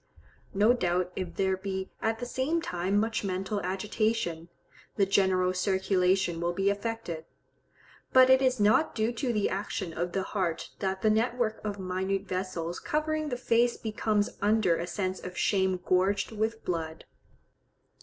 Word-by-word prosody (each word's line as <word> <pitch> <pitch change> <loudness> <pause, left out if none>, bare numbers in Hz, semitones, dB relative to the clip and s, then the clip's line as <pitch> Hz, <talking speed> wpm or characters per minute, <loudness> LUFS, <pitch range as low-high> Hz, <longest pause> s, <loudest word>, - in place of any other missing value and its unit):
No 210 +4 +5
doubt 180 -5 0
if 185 -2 -4
there 190 -1 +1
be 190 0 -4
at 225 0 0
the 245 - -5
same 265 +7 0
time 190 - -1
much 225 +1 -1
mental 195 +1 -2
agitation, 190 -3 -1 0.5
the 200 - +3
general 190 -2 +2
circulation 190 -2 +1
will 175 0 0
be 195 +2 +2
affected; 200 -6 -4 0.9
but 260 0 +7
it 260 0 +6
is 255 -2 +2
not 215 +9 +3
due 220 +1 +1
to 245 +1 -1
the 210 -3 +1
action 190 -2 -3
of 175 +2 -3
the 190 - 0
heart 185 -5 -2
that 190 -1 -2
the 215 - +5
network 225 0 0
of 205 -1 -3
minute 190 +1 -2
vessels 185 -3 -3
covering 310 -1 -1
the 245 - -2
face 240 0 +2
becomes 215 -1 0
under 205 -4 +3
a 170 +1 -3
sense 185 0 -2
of 180 0 -8
shame 190 -2 +1
gorged 195 +3 +2
with 220 +1 -2
blood. 160 -2 -3
195 Hz, 155 wpm, -29 LUFS, 185-225 Hz, 0.9 s, but